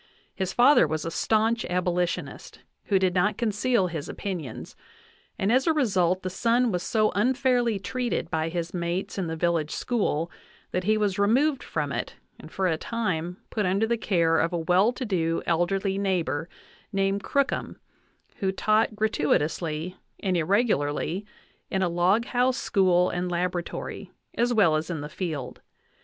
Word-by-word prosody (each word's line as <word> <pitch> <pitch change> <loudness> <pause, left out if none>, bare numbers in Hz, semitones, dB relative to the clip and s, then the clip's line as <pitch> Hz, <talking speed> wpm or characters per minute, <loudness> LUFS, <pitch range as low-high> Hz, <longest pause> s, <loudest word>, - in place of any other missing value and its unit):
His 190 -1 -2
father 245 - +5
was 155 0 -3
a 165 - -3
staunch 225 +5 +1
abolitionist, 180 0 -2 0.2
who 200 - +3
did 185 -1 +2
not 190 +3 +1
conceal 230 -1 +1
his 165 -5 -4
opinions, 170 - -6 0.6
and 195 +3 +1
as 260 +6 +3
a 325 - +4
result 190 - +2
the 185 - -2
son 235 +4 +2
was 180 -2 -1
so 215 +2 +1
unfairly 245 0 +2
treated 245 +5 -3
by 160 -1 0
his 170 0 -4
mates 175 +2 -2
in 180 - -1
the 160 - -3
village 165 -2 0
school 170 -7 -1 0.4
that 180 0 -2
he 215 +1 +3
was 205 -2 0
removed 260 +8 +3
from - - -3
it - - -4 0.2
and - - -12
for 190 - -1
a 160 -3 +1
time 180 -7 -2
put 210 -4 0
under 195 +4 +2
the 235 +1 +1
care 170 -7 +2
of 165 - +1
a 175 - -1
well 180 +6 +3
to 255 +1 -5
do 165 -5 0
elderly 190 +3 0
neighbor 170 -5 -1 0.4
named 195 0 0
Crookham, 280 -1 -1 0.6
who 195 -5 0
taught 215 +3 +1
gratui 215 -8 +2
tously 160 +3 -3 0.2
and 190 -2 0
irregularly 180 - 0 0.4
in 190 -1 0
a 180 - +1
log 180 +7 +2
house 250 +1 +1
school 180 -2 +2
and 180 0 -2
laboratory, 175 0 -3 0.2
as 240 +1 +1
well 200 -9 +4
as 155 +2 -2
in 165 -4 -3
the 150 - -6
field. 155 -7 -5
190 Hz, 165 wpm, -26 LUFS, 170-220 Hz, 0.6 s, father